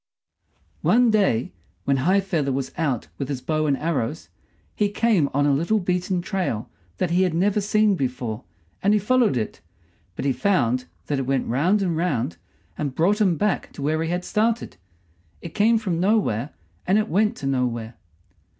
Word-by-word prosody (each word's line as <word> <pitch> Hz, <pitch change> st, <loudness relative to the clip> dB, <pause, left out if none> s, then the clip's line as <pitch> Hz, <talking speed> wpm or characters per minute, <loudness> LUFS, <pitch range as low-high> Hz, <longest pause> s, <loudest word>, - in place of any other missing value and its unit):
One 240 Hz, 0 st, +4 dB
day, 195 Hz, -, +2 dB, 0.3 s
when 140 Hz, -1 st, +1 dB
High 185 Hz, +9 st, +3 dB
feather 165 Hz, -8 st, -1 dB
was 135 Hz, 0 st, -2 dB
out 145 Hz, -9 st, -1 dB
with 135 Hz, -1 st, -3 dB
his 140 Hz, -3 st, -2 dB
bow 155 Hz, +3 st, -1 dB
and 140 Hz, -2 st, +2 dB
arrows, 155 Hz, -2 st, -2 dB, 0.4 s
he 205 Hz, -1 st, +1 dB
came 205 Hz, -8 st, +2 dB
on 145 Hz, +1 st, +1 dB
a 145 Hz, -, +3 dB
little 170 Hz, +10 st, +1 dB
beaten 180 Hz, -1 st, -1 dB
trail 185 Hz, -, -2 dB, 0.3 s
that 180 Hz, -2 st, -1 dB
he 180 Hz, +2 st, +3 dB
had 180 Hz, -3 st, +1 dB
never 205 Hz, +4 st, +2 dB
seen 210 Hz, +1 st, +3 dB
before, 125 Hz, -, -3 dB, 0.4 s
and 200 Hz, +2 st, +3 dB
he -, -, +3 dB
followed 230 Hz, -, +2 dB
it 110 Hz, -7 st, -4 dB, 0.5 s
but -, -, -4 dB
he 135 Hz, -, +2 dB
found 125 Hz, -, +1 dB, 0.2 s
that 145 Hz, -2 st, -1 dB
it 130 Hz, -, -3 dB
went 135 Hz, -1 st, +1 dB
round 175 Hz, -, +2 dB
and 175 Hz, -3 st, 0 dB
round 125 Hz, -, -1 dB, 0.4 s
and 140 Hz, -3 st, -2 dB
brought 200 Hz, +6 st, +2 dB
him 185 Hz, -6 st, +3 dB
back 210 Hz, +4 st, -1 dB
to 140 Hz, -, -7 dB
where 155 Hz, +2 st, 0 dB
he 165 Hz, -, -1 dB
had 180 Hz, +1 st, -2 dB
started. 225 Hz, +2 st, 0 dB, 0.6 s
It 170 Hz, -, -9 dB
came 225 Hz, +2 st, +4 dB
from 190 Hz, -7 st, -2 dB
nowhere, 180 Hz, -, +1 dB, 0.4 s
and 190 Hz, +3 st, +4 dB
it 215 Hz, +1 st, +1 dB
went 215 Hz, +4 st, +2 dB
to -, -, -7 dB
nowhere. 125 Hz, -4 st, -1 dB
170 Hz, 180 wpm, -23 LUFS, 135-205 Hz, 0.6 s, One